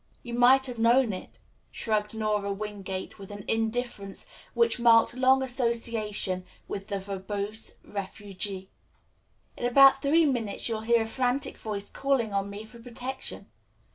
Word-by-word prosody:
"You 240 - -7
might 255 +2 +5
have 245 -3 -4
known 235 0 +4
it," 185 - -8 0.3
shrugged 210 -1 -1
Nora 210 -2 0
Wingate 195 -2 -5
with 195 - -10
an 205 -1 -8
indifference 225 -3 -2 0.3
which 465 - +3
marked 230 -1 +5
long 260 +1 +4
association 230 -6 0 0.2
with 195 0 -5
the 200 -2 -2
verbose 200 +2 -3
refugee. 195 -1 -5 0.8
"In - - -4
about 270 +2 +7
three 315 +3 +4
minutes 235 -8 -1
you'll 225 -2 -2
hear 230 0 +3
a - - -6
frantic 250 +3 -1
voice 205 -2 -5
calling 265 -6 0
on 200 0 -1
me 200 +2 -7
for 235 +2 -14
protection. 250 +2 -7
225 Hz, 140 wpm, -28 LUFS, 200-245 Hz, 0.8 s, about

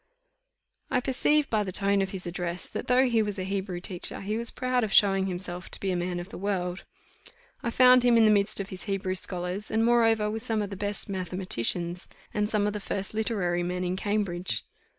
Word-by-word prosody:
I - - +2
perceived 275 +3 +2
by 215 -2 +2
the 190 - -4
tone 200 +1 +2
of 195 - -1
his 190 -1 -5
address, 175 0 -4
that, - - -5
though 255 +1 +4
he 235 -3 +2
was 205 -1 -2
a 185 - -2
Hebrew 190 -1 -3
teacher, 180 -1 -2
he 205 +2 -2
was 230 +1 0
proud 255 -1 0
of 215 - -2
showing 195 -1 +5
himself 180 -1 -4
to - - -7
be 195 - -1
a - - 0
man 175 0 -2
of 175 +2 -7
the - - -8
world. 185 -2 -2 0.8
I 235 - -1
found 250 +1 +6
him 240 -1 +4
in 225 - +6
the 215 - +6
midst 205 0 +3
of 195 - -4
his 185 - -7
Hebrew 195 -1 -1
scholars, 185 +2 -4
and 225 +1 +2
moreover 225 -2 +3
with 220 +1 -4
some 225 -3 -1
of 200 - -6
the - - -4
best 205 +1 -3
mathematicians, 180 - -2 0.3
and 210 0 0
some 210 -2 +1
of 210 - 0
the 210 - -3
first 195 0 -4
literary 200 -6 0
men 180 +1 -2
in 180 0 -1
Cambridge. 190 -3 -1
200 Hz, 220 wpm, -27 LUFS, 180-220 Hz, 0.8 s, found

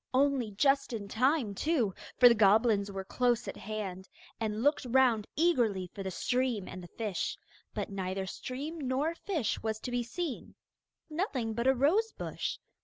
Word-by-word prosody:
Only 270 -4 +3
just 275 +6 +2
in 210 -3 -4
time 250 +1 +1
too, 245 - +1 0.2
for 250 - +9
the 240 - +7
goblins 210 -1 +4
were 195 -1 -4
close 240 +3 +1
at - - -4
hand, 195 -3 -5 0.3
and 220 0 -2
looked 290 +2 +3
round 245 -4 +3
eagerly 235 - +2
for 200 - -6
the 190 - -3
stream 245 +1 0
and 185 - -7
the 175 - -9
fish. 210 -1 -3 0.4
But - - -3
neither 190 0 -2
stream 280 - -5
nor 275 +4 0
fish 335 - -2
was 220 -1 -2
to 250 - -4
be 245 0 +1
seen; 270 +4 -5 0.5
nothing 305 - -2
but 235 +3 -1
a 265 - +5
rose 370 - +2
bush. - - -4
240 Hz, 170 wpm, -31 LUFS, 205-275 Hz, 0.5 s, for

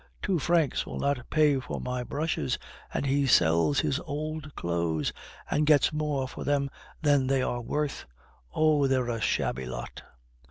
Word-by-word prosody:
Two 185 -4 +1
francs 165 -1 +2
will - - -5
not 140 -3 -1
pay 150 -3 +3
for 130 - -5
my 125 0 -3
brushes, 140 - -1 0.3
and - - -2
he 140 0 +2
sells 85 - +4
his 145 -2 0
old 155 -1 -5
clothes, 85 -3 -1 0.3
and 150 - +1
gets 150 -1 +5
more 150 -3 -1
for - - -7
them 140 -1 0 0.3
than 145 -3 +3
they 135 -1 +2
are 120 -1 -2
worth. 145 +4 -2 0.5
Oh! 155 -3 +3
they're 130 -2 +1
a 115 -2 -2
shabby 65 -9 0
lot!" 65 - -6
140 Hz, 160 wpm, -28 LUFS, 125-150 Hz, 0.5 s, gets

